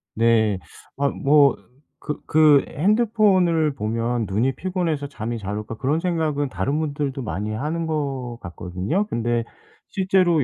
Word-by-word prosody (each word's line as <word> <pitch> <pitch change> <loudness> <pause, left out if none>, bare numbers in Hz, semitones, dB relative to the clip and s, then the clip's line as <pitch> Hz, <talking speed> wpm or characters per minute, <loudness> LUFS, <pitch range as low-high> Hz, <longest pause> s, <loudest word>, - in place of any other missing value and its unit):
네. 110 -3 +3 0.4
아 140 0 +2
뭐 140 -1 +4 0.5
그 150 - -4
그 155 -2 +5
'핸드폰을 190 - +2
보면 115 +2 -1
눈이 115 +7 +1
피곤해서 170 -6 -2
잠이 120 -4 -5
잘 105 -1 -4
올까.' 105 +1 -6
그런 140 +7 0
생각은 160 -5 0
다른 130 - -1
분들도 145 -3 -2
많이 105 +3 -3
하는 155 +9 -2
것 135 -6 -3
같거든요. 90 - -2
근데 120 0 0 0.5
실제로 185 -5 +2
140 Hz, 265 characters per minute, -23 LUFS, 115-160 Hz, 0.5 s, 그